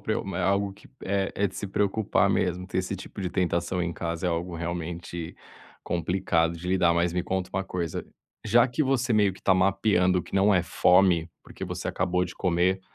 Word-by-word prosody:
preo -, -, -2 dB
é -, -, -1 dB
algo 100 Hz, +2 st, +1 dB
que 100 Hz, -, -18 dB, 0.2 s
é 100 Hz, 0 st, -1 dB
é 100 Hz, -, +1 dB
de 95 Hz, -, -9 dB
se 100 Hz, -, -4 dB
preocupar 100 Hz, +2 st, +1 dB
mesmo, 90 Hz, +1 st, 0 dB
ter 95 Hz, -, -2 dB
esse 95 Hz, +1 st, -2 dB
tipo 100 Hz, -, -9 dB
de 95 Hz, -, -1 dB
tentação 90 Hz, -1 st, -1 dB
em 85 Hz, 0 st, -2 dB
casa 85 Hz, +1 st, -3 dB
é -, -, +1 dB
algo 85 Hz, +1 st, -3 dB
realmente 85 Hz, 0 st, -5 dB, 0.5 s
complicado 85 Hz, -1 st, 0 dB
de 85 Hz, +2 st, -8 dB
lidar. 90 Hz, -2 st, +3 dB
Mas 85 Hz, 0 st, +1 dB
me 90 Hz, -, -1 dB
conta 95 Hz, 0 st, -3 dB
uma 95 Hz, -, -1 dB
coisa, 85 Hz, -4 st, -4 dB, 0.4 s
já 115 Hz, +2 st, +5 dB
que 130 Hz, +4 st, -1 dB
você 130 Hz, -3 st, +1 dB
meio 105 Hz, -3 st, +3 dB
que 95 Hz, -, -16 dB
tá 95 Hz, -, +4 dB
mapeando 95 Hz, -1 st, +2 dB
que -, -, -11 dB
não 100 Hz, +1 st, +4 dB
é 90 Hz, -, +3 dB
fome, 90 Hz, -2 st, +3 dB
porque -, -, -8 dB
você -, -, -4 dB
acabou 90 Hz, 0 st, 0 dB
de 90 Hz, -, -8 dB
comer, 90 Hz, +1 st, +1 dB
90 Hz, 205 wpm, -26 LUFS, 85-95 Hz, 0.5 s, já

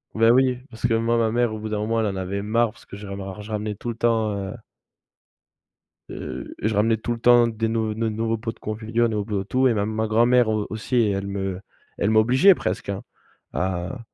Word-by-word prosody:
Beh, 115 Hz, +1 st, +5 dB
oui, 130 Hz, 0 st, +3 dB
parce 115 Hz, 0 st, -2 dB
que 115 Hz, -, +1 dB
moi, 115 Hz, +1 st, +1 dB
ma 110 Hz, -1 st, +2 dB
mère 120 Hz, -2 st, +1 dB
au 110 Hz, -, -5 dB
bout 110 Hz, -, -5 dB
d'un 105 Hz, -, -1 dB
moment 115 Hz, +2 st, 0 dB
elle 110 Hz, -, +1 dB
en 95 Hz, -, -3 dB
avait 95 Hz, +1 st, -3 dB
marre 115 Hz, +2 st, +1 dB
parce -, -, -19 dB
que -, -, -10 dB
je 105 Hz, -, -9 dB
ramer 100 Hz, 0 st, -6 dB, 0.2 s
je 110 Hz, -, -9 dB
ramenais 105 Hz, 0 st, -2 dB
tout 120 Hz, +4 st, -6 dB
le 115 Hz, -, -3 dB
temps, 115 Hz, -3 st, +1 dB
heu 100 Hz, +1 st, -4 dB, 1.6 s
heu, -, -, -7 dB
je 110 Hz, +1 st, 0 dB
ramenais 110 Hz, +2 st, +2 dB
tout 110 Hz, +2 st, -4 dB
le 120 Hz, -, -2 dB
temps 120 Hz, 0 st, +6 dB
des 115 Hz, 0 st, -2 dB
nou 110 Hz, -1 st, -1 dB
ne 115 Hz, +1 st, -1 dB
nouveaux 115 Hz, +1 st, -1 dB
pots 115 Hz, +1 st, -4 dB
de -, -, -27 dB
confiture, 110 Hz, +2 st, -1 dB
ne 110 Hz, -, -2 dB
nou 105 Hz, -1 st, -1 dB
no 100 Hz, -2 st, -1 dB
et -, -, -19 dB
tout, 130 Hz, +4 st, +2 dB
et 120 Hz, -, +3 dB
ma 100 Hz, -1 st, 0 dB
ma 110 Hz, 0 st, -1 dB
grand-mère 120 Hz, +2 st, +4 dB
au 110 Hz, -1 st, 0 dB
aussi 110 Hz, +4 st, -4 dB
elle 100 Hz, -4 st, +1 dB
me 95 Hz, -2 st, -3 dB, 0.4 s
elle 100 Hz, -, +1 dB
m'obligeait, 130 Hz, -, +5 dB
presque, -, -, -3 dB
hein, 95 Hz, -, -3 dB, 0.5 s
à 90 Hz, +7 st, -2 dB
110 Hz, 240 wpm, -23 LUFS, 105-115 Hz, 1.6 s, temps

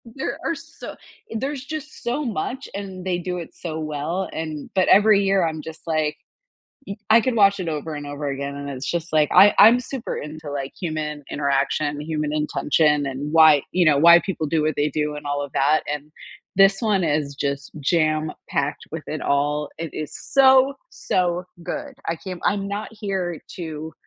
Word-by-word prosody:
there 265 Hz, -, -4 dB
are 330 Hz, -, -1 dB
so 325 Hz, +2 st, -10 dB, 0.4 s
there's 270 Hz, +2 st, -3 dB
just 305 Hz, +1 st, -7 dB
so 250 Hz, +5 st, -1 dB
much, 245 Hz, -, -3 dB
and 190 Hz, -2 st, -6 dB
they 180 Hz, -1 st, 0 dB
do 180 Hz, 0 st, -4 dB
it 170 Hz, -, -8 dB
so 160 Hz, -2 st, -5 dB
well, 155 Hz, +5 st, -3 dB
and 155 Hz, -2 st, -5 dB
but 185 Hz, -, +3 dB
every 205 Hz, 0 st, +6 dB
year, 195 Hz, -3 st, +2 dB
I'm 155 Hz, -1 st, -4 dB
just 160 Hz, +1 st, -9 dB
like, 155 Hz, -1 st, 0 dB, 0.7 s
y 200 Hz, -, -6 dB
I 225 Hz, +1 st, +7 dB
could 250 Hz, +1 st, -1 dB
watch 200 Hz, -1 st, +4 dB
it 170 Hz, -, -3 dB
over 155 Hz, +1 st, -4 dB
and 145 Hz, 0 st, -6 dB
over 145 Hz, 0 st, -5 dB
again, 140 Hz, 0 st, -4 dB
and 140 Hz, 0 st, -6 dB
it's 130 Hz, -1 st, -5 dB
just 170 Hz, -1 st, -3 dB
like, 150 Hz, -2 st, +4 dB
I 205 Hz, -, +8 dB
I'm 225 Hz, +4 st, +8 dB
super 255 Hz, -1 st, -5 dB
into, 150 Hz, 0 st, -7 dB
like, 135 Hz, -1 st, -4 dB
human 155 Hz, -4 st, -4 dB
interaction, 145 Hz, +1 st, 0 dB
human 150 Hz, -1 st, -2 dB
intention, 150 Hz, -1 st, +1 dB
and 140 Hz, +2 st, -4 dB
why, 160 Hz, -3 st, +7 dB
you 180 Hz, -1 st, +2 dB
know, 150 Hz, -2 st, +5 dB
why 170 Hz, +3 st, +8 dB
people 175 Hz, -5 st, -3 dB
do 160 Hz, +1 st, +1 dB
what 155 Hz, 0 st, 0 dB
they 145 Hz, +1 st, +1 dB
do 150 Hz, +1 st, -2 dB
and 150 Hz, -, -8 dB
all 145 Hz, 0 st, -1 dB
of 140 Hz, -2 st, -6 dB
that. 150 Hz, +3 st, +3 dB
And 150 Hz, +1 st, -5 dB, 0.4 s
this 195 Hz, 0 st, +5 dB
one 210 Hz, -5 st, +2 dB
is 145 Hz, -2 st, -1 dB
just 140 Hz, 0 st, -3 dB
jam 155 Hz, +1 st, +1 dB, 0.2 s
packed -, -, -2 dB
with -, -, -5 dB
it -, -, -4 dB
all 145 Hz, +1 st, 0 dB
it 165 Hz, -1 st, -5 dB
is 155 Hz, -1 st, -5 dB, 0.2 s
so, 265 Hz, 0 st, +6 dB, 0.2 s
so 180 Hz, -1 st, -1 dB, 0.2 s
good. 280 Hz, -, -5 dB
I 165 Hz, -, 0 dB
can't 185 Hz, -1 st, -7 dB
I'm 200 Hz, 0 st, 0 dB
not 205 Hz, +2 st, -4 dB
here 190 Hz, -6 st, -3 dB, 0.2 s
to 160 Hz, -2 st, -6 dB
160 Hz, 190 wpm, -22 LUFS, 150-195 Hz, 0.7 s, I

